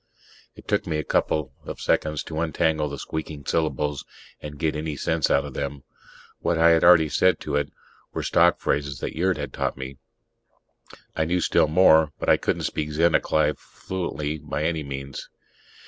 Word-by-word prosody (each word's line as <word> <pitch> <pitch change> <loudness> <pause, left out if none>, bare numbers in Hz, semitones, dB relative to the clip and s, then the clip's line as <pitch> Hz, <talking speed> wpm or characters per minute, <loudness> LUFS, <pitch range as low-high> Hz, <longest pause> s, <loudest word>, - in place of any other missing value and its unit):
It - - -15
took - - 0
me 80 - -1
a 75 - -2
couple 75 -1 0
of - - -7
seconds 75 -1 0
to 80 -1 -5
untangle 80 -2 0
the 70 - -6
squeaking 75 -1 -6
syllables 75 -2 -1 0.4
and 75 -1 -8
get 80 0 -1
any 75 0 -3
sense 80 +2 0
out 70 - +2
of 70 - -8
them. 70 0 -4 0.6
What 85 - 0
I 85 +1 +6
had 80 -1 +3
already 85 -3 +7
said 90 +5 +2
to - - -3
it 75 0 -1 0.4
were - - -4
stock 85 +1 +3
phrases 70 -1 -1
that - - -4
Yurt 90 +2 +1
had 70 -1 -5
taught - - -2
me; 65 0 -7 1.2
I 80 - +1
knew 90 +3 +1
still 85 - +3
more, 80 -2 +5
but - - -2
I - - +6
couldn't - - -1
speak 75 - -2
Zennacai 80 -1 +2
fluently 80 -5 -5
by 75 +1 -4
any 80 0 0
means. 70 -1 -7
75 Hz, 180 wpm, -24 LUFS, 75-80 Hz, 1.2 s, already